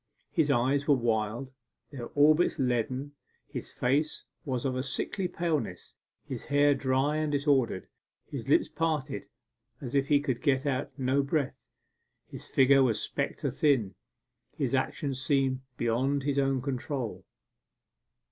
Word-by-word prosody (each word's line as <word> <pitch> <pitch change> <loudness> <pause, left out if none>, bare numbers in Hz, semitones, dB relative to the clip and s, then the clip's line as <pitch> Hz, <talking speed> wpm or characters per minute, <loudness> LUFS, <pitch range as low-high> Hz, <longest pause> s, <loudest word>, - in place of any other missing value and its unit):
His 160 -4 +2
eyes 140 +2 +2
were 145 - +6
wild, 115 +1 -1 0.4
their 125 -5 -6
orbits 155 +4 +4
leaden. 130 +2 -1 0.4
His - - -5
face 145 +5 0 0.2
was 130 -3 -2
of 130 -1 0
a 130 - 0
sickly 145 +8 -1
paleness, 155 - -2 0.3
his - - -6
hair 145 0 +4
dry 135 +2 +1
and 155 -1 0
disordered, 140 -8 +1 0.4
his - - -6
lips - - +4
parted 150 -3 -2 0.5
as 125 -3 -7
if 140 -1 +2
he 145 -1 +4
could 130 -4 -2
get 140 -2 +2 0.3
no 135 +1 +2
breath. 140 0 -1 0.6
His - - -6
figure 135 +1 +5
was 115 -5 +2
spectre 140 0 -2
thin. 130 -8 +2 0.6
His - - -1
actions 135 -2 -1
seemed 135 -1 +1 0.2
beyond 130 +4 +1
his 140 0 +1
own 135 -2 +1
control. 130 -2 -3
135 Hz, 135 wpm, -29 LUFS, 130-145 Hz, 0.6 s, were